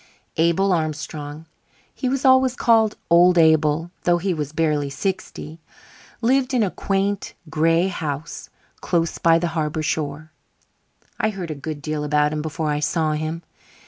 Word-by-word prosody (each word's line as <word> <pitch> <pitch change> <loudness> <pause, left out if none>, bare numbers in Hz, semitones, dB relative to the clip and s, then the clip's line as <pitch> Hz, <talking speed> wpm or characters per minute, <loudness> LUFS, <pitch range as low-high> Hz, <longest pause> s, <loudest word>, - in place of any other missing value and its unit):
Abel 170 +4 +3
Armstrong 155 -1 -4 0.5
(he 255 - -2
was 275 +1 -1
always 260 -1 +5
called 225 -3 +3
"Old 175 +1 +6
Abel", 160 0 +3
though 175 0 +3
he 185 +2 -1
was 150 -3 -4
barely 150 -3 0
sixty) 160 +1 -5 0.6
lived 260 +2 +2
in 235 - +3
a 195 - -1
quaint, 195 0 -2 0.2
gray 165 +3 +2
house 155 -4 -5 0.3
close 165 -2 -1
by 165 -1 +5
the 170 0 -1
harbour 155 -1 -1
shore. 150 0 -3 0.9
I 220 - +2
heard 185 -6 -5
a - - -1
good 145 0 -7
deal 155 -1 -2
about 150 0 +1
him 150 - -2
before 155 0 -2
I 145 - 0
saw 155 +1 0
him. 155 +2 -3
165 Hz, 150 wpm, -22 LUFS, 150-190 Hz, 0.9 s, Old